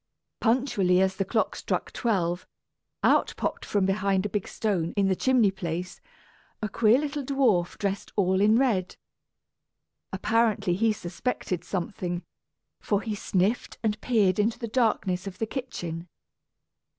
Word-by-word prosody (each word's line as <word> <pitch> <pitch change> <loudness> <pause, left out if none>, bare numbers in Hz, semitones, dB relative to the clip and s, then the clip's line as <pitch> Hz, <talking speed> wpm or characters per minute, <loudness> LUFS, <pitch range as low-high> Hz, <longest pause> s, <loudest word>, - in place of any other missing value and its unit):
Punctually 220 -7 +2
as 190 0 +1
the 195 - 0
clock 220 +3 0
struck - - -2
twelve, 180 -7 -1 0.6
out - - +3
popped - - -2
from 200 -2 +1
behind 195 0 +1
a - - -1
big 205 -1 -2
stone 185 -7 -1
in 195 -1 +3
the 190 - +2
chimney 245 -3 +3
place 180 -1 -5 0.6
a 215 - -2
queer 220 +2 +4
little 290 0 -2
dwarf 250 -10 +1
dressed 200 -1 -3
all 190 -1 +2
in 215 +2 +5
red. 220 -9 +1 1.2
Apparently 215 -1 +1
he 220 +5 +2
suspected 185 -2 -3
something, 180 -2 -3 0.6
for 205 -1 0
he 220 - -2
sniffed 200 +2 0
and 215 -1 0
peered 210 -6 +2
into 220 +2 +1
the 230 - -4
darkness 215 -6 0
of 190 - -7
the 225 - -1
kitchen. 175 - -5
200 Hz, 140 wpm, -27 LUFS, 185-225 Hz, 1.2 s, in